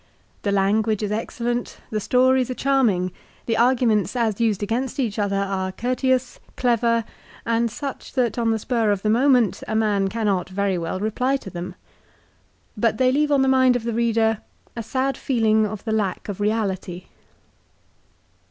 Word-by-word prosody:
The 200 - -1
language 210 +2 +1
is 210 - -2
excellent, 240 +2 -3
the 215 - -1
stories 255 +3 +3
are 255 - -3
charming, 235 -11 +1 0.3
the 230 - 0
arguments 235 -5 +2
as 230 -3 0
used 215 -3 +1
against 240 +6 -2
each 225 -5 -1
other, 200 -1 0
are 195 -1 -1
courteous, 255 +3 -1 0.2
clever, 235 -2 +2 0.4
and 230 0 +1
such 275 +4 -7
that 245 -2 0
on 230 -1 +1
the 225 - +2
spar 225 0 0
of 200 -2 0
the 215 - +2
moment 245 -4 +3
a 220 - -2
man 205 -3 +2
cannot 200 -4 -1
very 195 0 0
well 170 +1 -3
reply 250 +6 0
to 195 - -10
them. 175 +1 -6 1.0
But 220 0 +1
they 255 +1 +3
leave 295 +2 +1
on 275 -2 +4
the - - +2
mind 260 -1 +4
of 245 - -2
the 235 0 -2
reader 225 -1 +1 0.4
a 230 - -3
sad 260 +3 -1
feeling 220 -4 +2
of 205 -1 -7
the 225 - -3
lack 205 -4 -1
of 205 -2 -5
reality. 195 -4 -2
225 Hz, 170 wpm, -22 LUFS, 205-250 Hz, 1.0 s, on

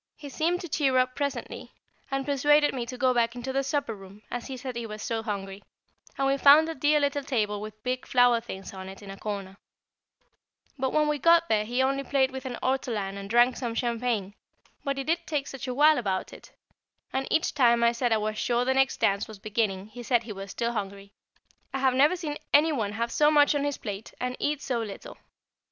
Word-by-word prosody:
He 290 -2 -10
seemed 335 +6 0
to 350 - -6
cheer 275 -4 +1
up 255 0 +2
presently, 285 -1 -4 0.4
and 270 0 -2
persuaded 295 +1 +3
me 245 -3 -4
to 255 +1 -6
go 255 0 +3
back 235 0 +1
into 250 +2 -5
the 270 - +1
supper 275 -3 -2
room, 200 +1 -13
as 245 -1 -4
he 265 - -6
said 255 0 -6
he 235 -1 -4
was 215 0 -7
so 225 -1 -2
hungry, 200 -2 -5 0.5
and 275 - +1
we 275 0 +2
found 290 +3 +7
a 325 - -3
dear 295 +1 +2
little 285 0 0
table, 210 -7 -1
with 215 0 -9
big 255 0 -3
flower 245 -2 +4
things 195 -5 -8
on 190 0 -8
it, 195 +2 -11
in 195 - -8
a 195 - -9
corner; 200 -2 -5 1.2
but 265 -1 -1
when 305 0 +2
we 300 -1 0
got 335 +3 +4
there 215 -1 +2
he 245 +4 0
only 275 +1 0
played 270 0 +1
with 265 0 -6
an 245 -2 -5
ortolan 230 -7 -1
and 200 0 -7
drank 240 +3 +4
some 235 -3 -3
champagne, 230 -5 -1 0.5
but 275 -1 -2
he 275 - -2
did 335 +3 -1
take 295 -3 -1
such 270 -1 -7
a 250 - -2
while 300 +1 +5
about 190 -5 -2
it; - - -13 0.6
and 265 0 -1
each 325 - +1
time 235 -4 +4
I 235 - +5
said 240 0 -1
I 220 - +4
was 215 0 -2
sure 240 0 +1
the 265 - +2
next 270 0 +2
dance 200 0 +1
was 220 - -10
beginning 205 -2 -1
he 245 +3 -9
said 240 -1 +1
he 220 -2 -7
was 195 0 -8
still 235 +4 -2
hungry. 200 -2 -6 0.6
I - - +1
have 265 -1 +2
never 290 +7 +4
seen 305 -5 -5
any 305 +3 +5
one 215 -8 -2
have 235 +2 -2
so 300 0 +4
much 295 -1 +5
on 290 -1 0
his 285 -1 -1
plate 205 -1 -7
and 250 0 -2
eat 295 0 -1
so 245 -3 -1
little. 225 - -8
250 Hz, 230 wpm, -27 LUFS, 215-280 Hz, 1.2 s, found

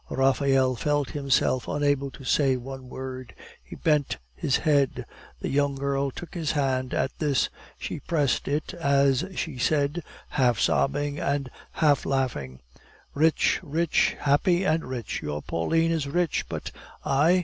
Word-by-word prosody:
Raphael 135 -1 +3
felt 145 +3 0
himself 135 -3 +1
unable 145 -1 +1
to 135 +2 -13
say 135 0 +2
one 130 0 -8
word; 130 -1 -7 0.3
he - - -10
bent 150 -3 +1 0.2
his 130 - +1
head. 145 -4 +1 0.4
The - - -2
young 140 0 +1
girl 140 0 0
took 170 +6 -9
his 165 -5 -1
hand 130 -3 0
at 135 - 0
this; 145 -5 +1 0.3
she - - -5
pressed 145 -6 0
it 150 +2 -1
as 140 -2 +2
she 145 -6 -3
said, 145 +4 +1 0.3
half 125 -6 +2
sobbing 145 +1 +1
and 140 -2 -1 0.2
half 145 -4 +3
laughing: 115 - -2 0.5
"Rich, 160 +2 +3
rich, 160 +3 +1
happy 175 +6 +3
and 160 -2 +1
rich! 125 -4 -4
Your 75 0 -4
Pauline 165 - +1
is 160 -4 -1
rich. 170 +3 0
But - - -5 0.3
I? 160 +7 +4
140 Hz, 145 wpm, -26 LUFS, 130-150 Hz, 0.5 s, I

